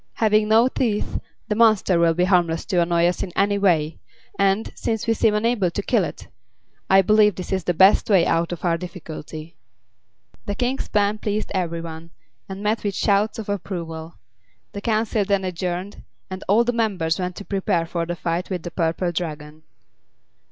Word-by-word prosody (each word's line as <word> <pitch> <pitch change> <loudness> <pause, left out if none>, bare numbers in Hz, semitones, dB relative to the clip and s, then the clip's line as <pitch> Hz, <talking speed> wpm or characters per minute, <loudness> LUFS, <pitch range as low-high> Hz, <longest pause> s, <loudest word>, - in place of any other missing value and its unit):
Having 215 -1 +2
no 225 +3 +5
teeth, 230 -5 -1 0.3
the - - 0
monster 215 -5 +3
will 165 -1 +3
be 180 - +2
harmless 175 -3 +2
to 180 -3 +1
annoy 170 0 +2
us 175 +1 0
in 185 - -4
any 200 +1 +2
way; 165 -5 +1 0.4
and, 200 +2 +1
since 225 -2 -2
we 230 - +2
seem 220 -1 +2
unable 210 -3 +1
to 200 +4 -4
kill - - +2
it, - - -7 0.6
I 195 0 +6
believe 210 0 +4
this 185 - -7
is 190 -2 -1
the 175 - 0
best 190 +6 +5
way 190 -5 +5
out 165 +1 +1
of 175 +1 -5
our 165 -1 +1
difficulty." 165 -2 -8 0.9
The 205 - -2
King's 250 +4 -2
plan 210 0 +1
pleased 210 0 -2
every 170 -3 -2
one, 165 0 -8 0.4
and 195 +1 -6
met 215 +2 0
with 200 -2 -2
shouts 205 +1 +1
of 220 - -6
approval. 170 -5 -5 0.6
The 200 - -6
council 215 -1 0
then 200 -1 0
adjourned, 180 +2 -4 0.3
and 185 0 -6
all 215 +4 +4
the 245 +1 -1
members 190 -8 0
went 180 -1 -3
to 205 - -8
prepare 185 -4 0
for 170 0 -3
the 175 - -3
fight 170 +1 -3
with 180 -4 -3
the 175 - -6
Purple 170 +1 -1
Dragon. 155 -3 -5
190 Hz, 185 wpm, -22 LUFS, 170-210 Hz, 0.9 s, I